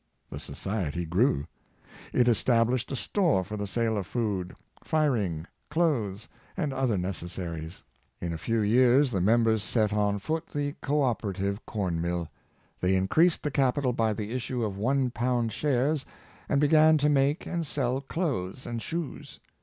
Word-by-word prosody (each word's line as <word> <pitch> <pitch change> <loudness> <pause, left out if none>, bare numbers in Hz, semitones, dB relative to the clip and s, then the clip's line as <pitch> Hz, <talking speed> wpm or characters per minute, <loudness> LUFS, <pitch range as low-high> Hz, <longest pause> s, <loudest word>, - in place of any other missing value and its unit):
The - - -5
society 85 -5 -3
grew. 85 - +2 0.7
It 125 -1 +3
established 120 +1 +2
a - - -1
store 160 - +1
for 105 +4 -6
the 105 -1 -3
sale 115 +1 0
of 95 - -5
food, 100 -7 -2 0.3
firing, 115 - 0 0.2
clothes 130 - 0 0.3
and 150 -6 -1
other 130 -6 +1
neces 90 -1 -4
saries. 85 -2 -6 0.4
In 85 -1 -3
a - - -3
few 115 +5 0
years 125 +5 +4
the 95 -5 0
members 110 +2 +3
set 105 0 +1
on 105 -1 +1
foot 160 +11 -3
the 145 -1 -2
Co 145 +1 +1
operative 100 -4 -1
Corn 90 -7 -2
mill. 85 -1 -2 0.5
They 90 +1 +2
increased 155 - +3
the 150 - -1
capital 135 -1 +1
by 115 -2 +1
the 105 0 -5
issue 125 -1 -2
of 100 -2 -3
one 130 +5 +1
pound 120 -1 0
shares 140 +4 +1 0.5
and 140 - +2
began 155 +2 +5
to 150 0 +2
make 145 +1 +2
and 170 -1 -2
sell 135 -3 -1
clothes 135 - -3
and 115 -1 -4
shoes. 165 +7 -5
115 Hz, 160 wpm, -28 LUFS, 100-140 Hz, 0.7 s, began